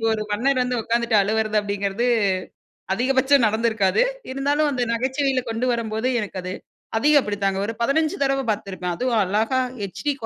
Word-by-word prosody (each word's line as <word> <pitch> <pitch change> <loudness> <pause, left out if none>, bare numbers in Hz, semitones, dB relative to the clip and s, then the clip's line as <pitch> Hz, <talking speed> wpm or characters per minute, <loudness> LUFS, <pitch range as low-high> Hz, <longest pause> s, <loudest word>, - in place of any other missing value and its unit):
இப்போ 225 - 0
ஒரு 215 - -2
மன்னர் 255 +5 +1
வந்து 250 -1 -1
உட்காந்துட்டு 235 -1 +1
அழுவறது 215 +1 0
அப்படிங்கிறது 200 +3 -2 0.9
அதிகபட்சம் 265 +1 +3
நடந்திருக்காது. 220 - +2 0.3
இருந்தாலும் 290 +3 +1
அந்த 250 -2 0
நகைச்சுவையில 260 +1 0
கொண்டு 225 +3 -1
வரம்போது 225 +1 -2
எனக்கு 195 -2 -5
அது 185 0 -4 0.4
அதயும் 295 +4 +5
அப்படித்தாங்க, 200 -2 -1
ஒரு 225 - -3
15 305 +5 +1
தடவை 270 0 +1
பார்த்துருப்பேன். 185 -4 -4
அதுவும் 245 -1 0
அழகா 220 +7 +1 0.2
ஹெச்டி 200 - -2
230 Hz, 145 wpm, -22 LUFS, 210-265 Hz, 0.9 s, அதயும்